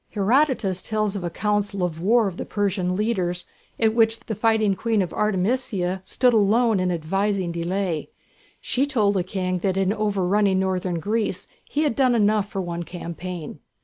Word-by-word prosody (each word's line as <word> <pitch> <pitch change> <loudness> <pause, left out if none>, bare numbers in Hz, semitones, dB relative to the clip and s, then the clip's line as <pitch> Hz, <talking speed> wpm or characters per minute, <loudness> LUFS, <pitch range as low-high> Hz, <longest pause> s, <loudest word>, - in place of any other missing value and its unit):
Herodotus 215 -3 +1
tells 215 -2 -1
of 195 - -4
a 175 - -1
council 205 +1 -1
of 165 -2 -2
war 220 +3 +3
of 185 -2 -5
the - - -3
Persian 190 -3 -1
leaders 185 -4 -1 0.3
at 220 -1 +3
which 225 0 +3
the 220 - -5
fighting 220 -1 +2
Queen 220 -1 +1
Artemisia 190 -1 -1
stood 250 +5 +2
alone 220 0 +3
in 185 0 +1
advising 190 +2 -1
delay. 170 -1 -2 0.5
She 270 +3 0
told 215 -8 +2
the 190 -3 0
King 185 0 -2
that 190 +1 -1
in 195 +1 +2
overrunning 200 -2 +1
northern 185 -2 -1
Greece 215 +6 -1 0.2
he 300 - 0
had 290 -7 0
done 255 -3 +3
enough 210 -2 +2
for 195 - -3
one 175 -1 -4
campaign. 170 -1 -7
200 Hz, 165 wpm, -23 LUFS, 180-220 Hz, 0.5 s, war